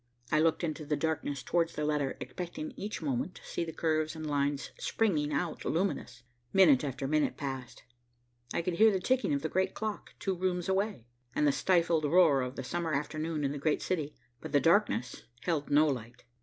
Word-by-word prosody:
I 155 - +4
looked 165 +2 +2
into 155 -1 -2
the 150 0 0
darkness 145 -3 -2
towards 170 -1 0
the 150 - -1
letter, 150 -3 0
expecting 280 - -5
each 205 -4 -5
moment 140 +5 -1
to - - -13
see - - -2
the 165 - -5
curves 155 -1 0
and 160 0 -6
lines 145 -1 -1
springing 155 -10 +1
out 155 +3 -2
luminous. 160 -9 -2 0.3
Minute 160 -9 +6
after 135 -1 -3
minute 155 +1 +1
passed. 135 -4 -6 0.7
I - - -1
could 170 0 -2
hear 220 0 +7
the 190 - 0
ticking 255 +3 +1
of 140 -1 0
the - - +1
great 190 +4 0
clock, 215 -1 -5
two 195 -3 -1
rooms 180 -1 -1
away, 190 - 0 0.3
and 150 - +2
the 145 - +5
stifled 170 0 +2
roar 155 -3 +5
of 125 +1 -4
the - - -5
summer 170 -3 -2
afternoon 155 +2 -2
in 140 - +1
the 145 - -4
great 150 +2 +1
city, 155 -5 -2 0.2
but - - -8
the 145 - +6
darkness 165 - +2 0.2
held 160 -5 -1
no 145 +2 +5
light. 125 -5 -4
155 Hz, 195 wpm, -31 LUFS, 145-180 Hz, 0.7 s, hear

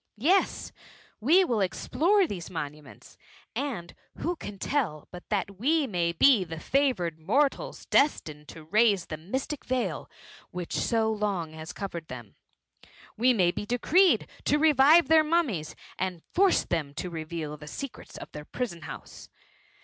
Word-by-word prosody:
Yes, 350 - +1 0.5
we 330 - +5
will 235 - 0
explore 355 - +2
these 185 - -6
monuments, 150 -4 -8 0.4
and 235 -12 -4 0.2
who 350 +2 -2
can 205 -10 -8
tell 190 - -2
but 180 -1 -11
that 200 -2 -2
we 300 +5 +2
may 175 -7 0
be 215 +5 +5
the 165 -2 -7
jfavoured 180 - 0
mortals 275 - 0
destined 155 - +1
to 160 - -11
raise 205 +2 +3
the 155 - -6
mystic 260 - -4
veil 255 -1 -2 0.4
which 180 -1 -6
so 225 -2 +1
long 200 -7 -2
has 160 +1 -8
covered 175 -5 -6
them? 120 -5 -9 0.8
We 250 +4 +4
may 185 -7 +3
be 205 - -6
decreed 345 - +3 0.2
to 295 - +3
revive 305 +2 +6
their 320 -1 +6
mummies, 300 - 0 0.2
and 180 -3 -3
force 385 +1 +4
them 150 -5 -2
to 180 - -4
reveal 160 -2 -5
the 150 0 -12
secrets 275 - -8
of - - -10
their 150 0 -8
prison 200 -7 -4
house. - - -10
205 Hz, 150 wpm, -27 LUFS, -, 0.8 s, revive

